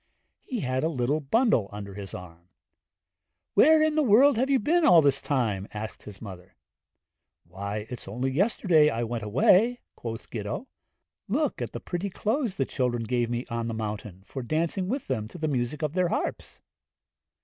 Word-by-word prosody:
He 245 -5 -4
had 130 -1 -1
a 160 - +2
little 140 0 0
bundle 155 - +2
under 100 -1 -7
his 100 -2 -7
arm. 85 -1 -11 1.0
'Where 315 +1 +6
in 310 0 +2
the 310 - +2
world 265 +3 +6
have 260 +4 +1
you 275 - +4
been 330 +9 +2
all 250 - +8
this 140 -1 +3
time?' 110 -10 -1
asked 110 0 -6
the 105 -2 -9
mother, 95 -2 -10 0.9
'Why, 100 +4 -5
it's 125 - -8
only 125 +7 -2
yesterday 170 - +3
I 115 -2 -2
went 120 0 -3
away!' 185 - +3 0.2
quoth 115 -1 -7
Gitto. 105 - -4 0.6
'Look 280 +8 0
at - - -3
the - - -4
pretty 180 +3 -4
clothes 220 +2 -1
the 135 - 0
children 125 -3 -1
gave 120 +1 0
me 120 +1 -2
on 115 0 -2
the 115 - -3
mountain, 105 -3 -5
for 135 - -6
dancing 165 - -1
with 260 +6 -2
them 105 -1 -2
to 145 - -11
the 155 -2 -2
music 135 +2 -2
of 150 -1 -1
their 180 0 +2
harps.' - - -3
130 Hz, 180 wpm, -27 LUFS, -, 1.0 s, all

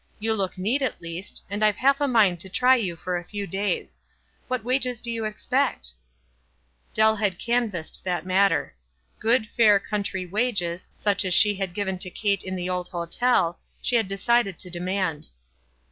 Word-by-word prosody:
You 220 +1 +1
look 195 -3 -1
neat, 220 +10 +1
at 265 - -1
least, 170 +3 -5
and 205 +2 -3
I've 210 -1 +4
half 275 +5 +2
a 285 - +2
mind 210 -9 +3
to 190 - -5
try 250 +6 +4
3 200 -5 -1
r - - -5
ou - - -12
for 180 +2 -3
a 175 - -6
few 205 +3 -5
days. 195 -1 -3 0.5
"What 255 -2 -1
w 245 +3 -1
r - - +2
nges 250 -3 -3
do 235 - -4
you 225 -1 -3
expect?" 65 - -1 1.0
Dell 220 0 +4
had 200 -4 0
canvassed 230 -9 0
that 180 -2 -2
matter. 195 +2 +2 0.5
Good, 230 +1 +3
fair 210 -3 +4
country 200 -3 -3
wages, 185 -4 -1
such 205 -1 +1
as 185 -2 +3
she 210 -2 +6
had 190 -3 -4
given 190 -3 -2
to 185 - -2
Kate 200 +1 0
in 185 0 -4
the 180 -1 -3
old 180 -1 -2
hotel, 175 +1 0 0.2
she 245 - 0
had 225 -4 +2
decided 195 -1 +1
to 180 - -4
demand. 180 -3 -2
200 Hz, 190 wpm, -25 LUFS, 180-225 Hz, 1.0 s, she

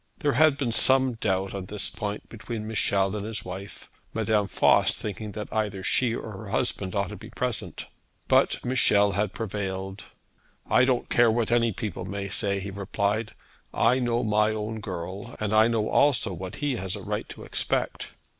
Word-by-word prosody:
There 145 - +1
had 150 +2 +5
been 130 -4 -1
some 130 +2 +4
doubt 95 -4 -1
on 95 -2 -5
this 105 +1 0
point 105 0 -4
between 115 -1 -6
Michel 100 -2 +1
and 105 - -3
his 110 0 -5
wife, 95 +2 -8 0.3
Madame 105 -2 +2
Voss - - +4
thinking 105 0 -5
that 105 +1 -6
either 105 -3 -1
she 120 +2 +2
or 110 - -6
her 100 +1 -8
husband 100 -4 -1
ought 100 -2 0
to - - -6
be - - -11
present. - - -3 0.4
But - - +3
Michel 105 -5 +4
had 100 +1 0
prevailed. 95 -2 -4 0.6
'I 130 - +5
don't 130 -2 0
care 120 -1 +5
what 115 0 +1
any 115 -1 +3
people 100 -4 -4
may 100 +1 -4
say,' 100 -1 -1
he 100 +1 -5
replied. 100 +2 -1 0.4
'I 125 +3 +4
know 120 -1 +1
my 105 -1 +3
own 110 +1 -3
girl; 95 +3 -6
and 110 -1 -1
I 110 +1 +6
know 115 -2 +1
also 140 -9 +3
what 90 +2 -6
he 145 -3 -1
has 95 +2 -3
a 100 - -7
right - - -3
to - - -9
expect.' - - -1
105 Hz, 185 wpm, -27 LUFS, 100-115 Hz, 0.6 s, I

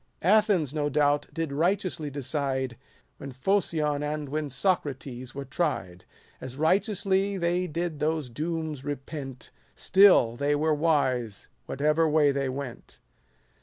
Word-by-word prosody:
Athens, 195 - +3
no 150 -1 0
doubt, 145 0 +2
did 165 -4 -3
righteously 170 -1 0
decide, 135 -2 -2 0.4
When 140 - -8
Phocion 150 -1 0
and 150 -1 -3
when 150 0 -2
Socrates 135 -4 -2
were 140 0 -5
tried: 130 - -3 0.4
As 130 0 -7
righteously 195 +3 +1
they 175 +1 0
did 165 -1 -3
those 155 -2 0
dooms 155 0 -3
repent; 135 -2 -6 0.2
Still 185 - +5
they 145 +3 +1
were 155 +1 +2
wise 130 -8 0 0.2
whatever 150 +3 +2
way 150 -2 +4
they 140 -1 -1
went. 130 -2 -7
150 Hz, 125 wpm, -27 LUFS, 135-165 Hz, 0.4 s, Still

